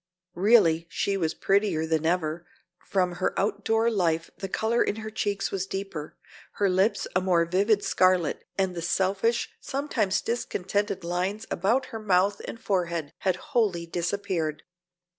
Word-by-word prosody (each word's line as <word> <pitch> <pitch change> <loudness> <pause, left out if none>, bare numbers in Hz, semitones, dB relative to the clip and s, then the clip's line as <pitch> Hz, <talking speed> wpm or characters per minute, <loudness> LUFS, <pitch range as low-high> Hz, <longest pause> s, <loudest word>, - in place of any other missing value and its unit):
Really 175 -5 +4
she 200 - -1
was 165 -5 -1
prettier 195 -5 +1
than 160 0 0
ever; 170 0 -1 0.4
from 185 -2 +1
her - - 0
outdoor 225 +3 +1
life 165 -5 0
the 195 0 -4
color 225 +4 +1
in - - -1
her 220 0 -6
cheeks 205 -2 -1
was 190 -1 -2
deeper, 195 -6 -5 0.4
her 200 -2 +1
lips 190 +4 +2
a 185 - +3
more 175 -2 +3
vivid 200 +4 +2
scarlet 185 -2 +2
and 190 -2 +1
the 170 - -5
selfish, 195 +6 +1
sometimes 255 -8 -1
discontented 205 -4 -2
lines 185 +5 -2
about 230 +9 +1
her 225 - -3
mouth 200 -1 +2
and 230 - -7
forehead 170 -7 -1
had 185 -2 +1
wholly 210 - 0
disappeared. 170 -3 -2
190 Hz, 145 wpm, -27 LUFS, 175-205 Hz, 0.4 s, Really